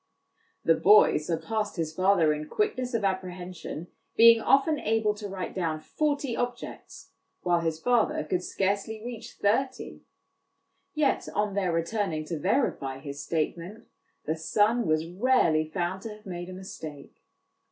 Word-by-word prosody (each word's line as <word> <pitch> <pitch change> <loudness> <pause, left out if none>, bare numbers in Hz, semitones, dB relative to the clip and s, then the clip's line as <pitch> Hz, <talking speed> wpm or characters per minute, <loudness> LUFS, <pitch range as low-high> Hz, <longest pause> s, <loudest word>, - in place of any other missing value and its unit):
The 165 - +5
boy 205 +6 +6
sur 160 +2 -2
passed 210 +6 -3
his 160 -3 -3
father 185 -3 +3
in 150 0 -5
quickness 255 - -1
of 220 - 0
apprehension, 180 -3 -4 0.3
being 230 0 +8
often 275 +4 +3
able 220 -1 +1
to 210 0 -7
write 190 -2 -5
down 165 -4 -2
forty 285 - -1
objects, 245 +1 -6 0.3
whilst 175 -2 +1
his 160 -1 -1
father 240 -3 +2
could 175 +4 -1
scarcely 200 +4 -1
reach 235 -2 -7
thirty; 255 +6 -1 0.9
yet 300 -2 +1
on 210 -1 0
their 190 -3 0
returning 165 -1 -1
to 160 0 -4
verify 185 - 0
his 140 +2 -7
statement, 170 +8 -3 0.4
the 155 - 0
son 210 +8 +1
was 155 0 +1
rarely 170 -5 +2
found 180 +3 -2
to 225 - -6
have 210 0 -12
made 175 -1 -6
a - - -7
mistake. 155 -6 -9
190 Hz, 145 wpm, -27 LUFS, 165-225 Hz, 0.9 s, being